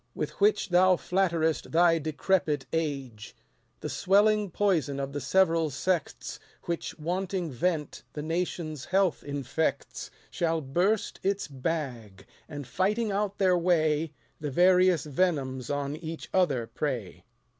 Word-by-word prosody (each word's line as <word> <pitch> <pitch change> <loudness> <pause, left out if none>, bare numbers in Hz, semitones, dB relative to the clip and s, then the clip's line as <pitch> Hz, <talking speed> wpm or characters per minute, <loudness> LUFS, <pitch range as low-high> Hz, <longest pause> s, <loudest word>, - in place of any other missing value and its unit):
With - - -5
which 415 - +3
thou 185 +1 +5
flatterest 170 -4 0
thy 165 0 +4
decrepit 155 -1 0
age. 135 -9 -3 0.5
The - - -3
swelling 205 +1 +3
poison 165 -8 +1
of 140 0 -4
the 145 - -3
several 165 +2 +3
sects, 165 +5 -2 0.2
Which, 170 -1 -4
wanting 180 +1 -2
vent, 155 +3 -1
the 150 - -5
nation's 165 -3 -3
health 190 -2 +1
infects, 145 +2 -2 0.2
Shall 165 -1 0
burst 175 +10 0
its 200 +1 -1
bag; 130 - -4 0.2
and, 145 -1 -6
fighting 210 - 0
out 205 0 -1
their 185 -2 +4
way, 160 -3 +2 0.3
The 150 - -3
various 180 +2 +4
venoms 135 -5 -1
on 145 0 -2
each 160 0 -7
other 145 -11 +2
prey. 120 -4 -4
165 Hz, 125 wpm, -28 LUFS, 145-185 Hz, 0.5 s, thou